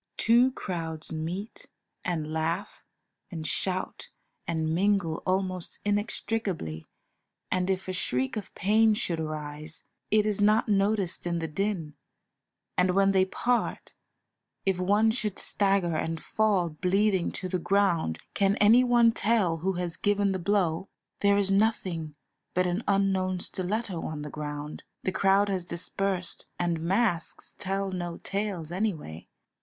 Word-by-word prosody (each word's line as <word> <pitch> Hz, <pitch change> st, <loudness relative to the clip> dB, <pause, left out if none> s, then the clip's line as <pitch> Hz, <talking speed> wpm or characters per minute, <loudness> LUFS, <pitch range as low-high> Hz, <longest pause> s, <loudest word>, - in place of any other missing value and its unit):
Two 240 Hz, +3 st, +5 dB
crowds 165 Hz, -6 st, -4 dB
meet 170 Hz, +7 st, -5 dB, 0.4 s
and 155 Hz, -3 st, -2 dB
laugh 160 Hz, +1 st, -2 dB, 0.5 s
and 160 Hz, -4 st, -6 dB
shout 185 Hz, +3 st, -2 dB, 0.4 s
and 160 Hz, -1 st, 0 dB
mingle 185 Hz, -3 st, +1 dB
almost 185 Hz, -1 st, -1 dB
inextricably, 205 Hz, -, -2 dB, 0.6 s
and 185 Hz, 0 st, +1 dB
if 190 Hz, 0 st, -1 dB
a 185 Hz, -, -2 dB
shriek 130 Hz, -7 st, 0 dB
of 210 Hz, -2 st, -5 dB
pain 215 Hz, +2 st, +4 dB
should 170 Hz, -5 st, -1 dB
arise, 155 Hz, 0 st, -5 dB, 0.3 s
it 215 Hz, 0 st, +4 dB
is 210 Hz, -1 st, 0 dB
not 215 Hz, +3 st, +4 dB
noticed 200 Hz, -3 st, +1 dB
in 170 Hz, 0 st, 0 dB
the 165 Hz, -1 st, -2 dB
din, 165 Hz, -1 st, -2 dB, 0.8 s
and 180 Hz, 0 st, +2 dB
when 195 Hz, 0 st, +4 dB
they 190 Hz, -1 st, +4 dB
part, 240 Hz, +5 st, -1 dB, 0.7 s
if 190 Hz, -2 st, +1 dB
one 205 Hz, +4 st, +3 dB
should 215 Hz, -4 st, -2 dB
stagger 195 Hz, -4 st, +2 dB
and 165 Hz, +1 st, -2 dB
fall 205 Hz, -5 st, +2 dB
bleeding 190 Hz, +3 st, +1 dB
to 185 Hz, -, -3 dB
the 185 Hz, 0 st, -1 dB
ground, 175 Hz, -, +1 dB, 0.2 s
can 200 Hz, 0 st, +2 dB
any 220 Hz, +5 st, +6 dB
one 240 Hz, -2 st, +5 dB
tell 210 Hz, -7 st, +1 dB
who 190 Hz, +4 st, -1 dB
has 175 Hz, -1 st, -3 dB
given 205 Hz, -1 st, +2 dB
the 190 Hz, -, -1 dB
blow? 180 Hz, -2 st, 0 dB, 0.3 s
There 200 Hz, 0 st, +4 dB
is 195 Hz, -1 st, +2 dB
nothing 185 Hz, -7 st, 0 dB, 0.4 s
but 180 Hz, 0 st, +3 dB
an 180 Hz, +4 st, 0 dB
unknown 190 Hz, -2 st, +1 dB
stiletto 190 Hz, 0 st, -2 dB
on 150 Hz, -1 st, -4 dB
the 150 Hz, -, -7 dB
ground, 150 Hz, 0 st, -5 dB, 0.2 s
the 190 Hz, -, 0 dB
crowd 195 Hz, +2 st, +3 dB
has 185 Hz, -3 st, -2 dB
dispersed, 185 Hz, +1 st, -1 dB
and 170 Hz, -2 st, 0 dB
masks 185 Hz, 0 st, 0 dB
tell 195 Hz, 0 st, -2 dB
no 175 Hz, -2 st, -4 dB
tales 195 Hz, -5 st, -3 dB
anyway. 175 Hz, -, -3 dB
185 Hz, 140 wpm, -28 LUFS, 165-205 Hz, 0.8 s, any